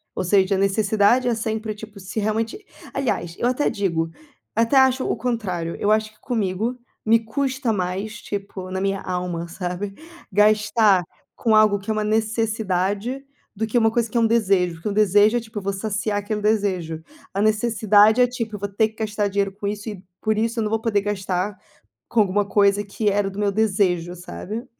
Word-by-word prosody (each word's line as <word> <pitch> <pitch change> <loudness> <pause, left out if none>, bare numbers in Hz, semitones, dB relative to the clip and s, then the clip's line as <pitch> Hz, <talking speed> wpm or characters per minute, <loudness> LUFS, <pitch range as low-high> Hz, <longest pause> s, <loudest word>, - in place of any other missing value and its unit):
Ou - - -1
seja, 190 +1 +3
a - - 0
necessidade 205 +5 +3
é 240 - +2
sempre, 220 -1 -3
tipo, 215 -1 -11
se 195 +3 -5
realmente 225 - -2 0.3
Aliás, 175 -10 -2
eu 240 - +1
até 255 +4 +1
digo, 165 -5 -1 0.4
até 230 +5 +3
acho 265 0 +4
o - - +1
contrário. 185 -9 -2
Eu 205 - +2
acho 215 0 +1
que 215 - -29
comigo 225 +1 -1 0.3
me 225 +1 +5
custa 255 +1 -1
mais 195 +3 -3
tipo 195 -2 -6
na 190 - -2
minha 195 0 -1
alma, 180 -2 -3
sabe. 180 +3 -4 0.4
Gastar 210 -1 +4 0.3
com 225 - +1
algo 215 -2 +5
que 195 - -10
é - - +1
uma 215 0 -1
necessidade 220 +2 -1 0.3
do 220 +2 -2
que 225 - 0
uma 225 -1 +4
coisa 235 0 0
que 235 - -2
é - - +4
um 225 - +4
desejo, 195 -6 +2
porque 165 +6 -4
um - - -2
desejo 210 +2 +4
é - - +1
tipo 220 -1 -7
eu - - -11
vou 200 +1 -1
saciar 205 +1 -2
aquele 210 +1 -3
desejo. 190 -7 0 0.3
A 200 - 0
necessidade 215 0 +4
é 250 - +6
tipo 230 -3 -4
eu - - -6
vou 200 +1 -3
ter 215 +2 +1
que 220 - -23
gastar 210 -1 -1
dinheiro 200 0 0
com 200 +1 -5
isso 205 +1 -4
e 195 -3 -8 0.2
por 215 -1 +1
isso 230 +2 0
eu - - +1
não 210 - -1
vou 225 0 0
poder 210 -3 +1
gastar 195 -1 -2 0.5
com 235 - +1
alguma 205 0 +1
coisa 200 0 +3
que 205 +1 -1
era 200 0 +1
do 195 +1 -8
meu 205 -1 +1
desejo, 190 -5 +1
sabe. 210 +6 -7
210 Hz, 200 wpm, -22 LUFS, 195-220 Hz, 0.5 s, é